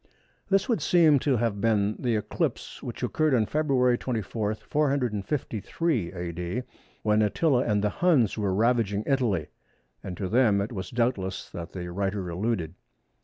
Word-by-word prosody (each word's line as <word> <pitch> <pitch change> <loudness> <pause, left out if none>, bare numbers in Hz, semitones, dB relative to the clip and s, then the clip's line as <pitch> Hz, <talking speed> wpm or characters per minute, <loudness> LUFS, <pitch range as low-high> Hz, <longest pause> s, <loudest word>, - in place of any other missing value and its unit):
This 195 -1 +3
would 235 - +1
seem 160 -5 +5
to 135 -1 +1
have 110 -3 -1
been 105 -2 +2
the 120 -3 0
eclipse 105 - -3
which - - -6
occurred 155 -3 +2
on 110 -3 +3
February 130 -4 +2
24, 110 -3 -2
453 125 - -1
A.D., 90 +5 -4 0.4
when 105 0 +3
Attila 125 +5 +2
and 105 -3 +1
the 105 - +2
Huns 140 - +2
were 105 -3 -1
ravaging 110 -1 +1
Italy, 110 - 0 0.5
and 90 -2 -6
to 95 - -2
them 110 -1 +3
it 100 +4 -2
was 95 -5 -5
doubtless 115 -6 -1
that 85 -1 -7
the 90 -2 -5
writer 95 0 -2
alluded. 90 -2 -2
110 Hz, 150 wpm, -27 LUFS, 100-130 Hz, 0.5 s, seem